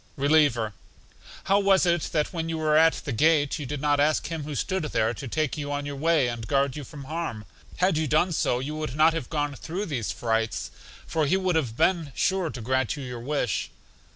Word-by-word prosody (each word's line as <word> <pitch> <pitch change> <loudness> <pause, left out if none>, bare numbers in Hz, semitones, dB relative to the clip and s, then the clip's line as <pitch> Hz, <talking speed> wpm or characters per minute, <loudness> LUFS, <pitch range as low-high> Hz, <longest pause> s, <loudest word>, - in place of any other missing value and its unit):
Reliever: 140 -7 +3 0.7
How 195 +1 +3
was 195 -1 +4
it 175 -1 +2
that 150 +1 0
when 165 -1 -3
you 165 - -2
were 155 -1 +2
at 160 +1 +6
the 145 - -2
gate 145 +4 +2
you 145 - -5
did 145 +1 -4
not 145 0 +2
ask 150 +1 +2
Him 160 -3 -4
who 150 -1 -5
stood 190 +4 -1
there 115 -5 0
to 130 +4 -7
take 155 +3 -1
you 145 0 -4
on 145 0 -2
your 145 0 -4
way, 155 -2 +2
and 120 -2 -5
guard 140 0 +1
you 150 - -5
from 140 +2 -10
harm? 135 -7 -4 0.3
Had 185 -3 +2
you 155 -1 0
done 155 +6 +2
so 140 -6 +1
you 140 +4 -4
would 155 -3 -4
not 155 +2 +5
have 160 -7 -4
gone 145 -2 -1
through 175 +8 -5
these 130 - -3
frights, 115 -1 -1 0.3
for 155 -2 0
He 185 - +3
would 185 -2 0
have 125 -8 -1
been 165 -6 +2
sure 190 -3 +1
to 120 -2 -7
grant 130 +3 0
you 145 - -7
your 125 -2 -6
wish. 125 -3 -1
150 Hz, 225 wpm, -26 LUFS, 130-165 Hz, 0.7 s, at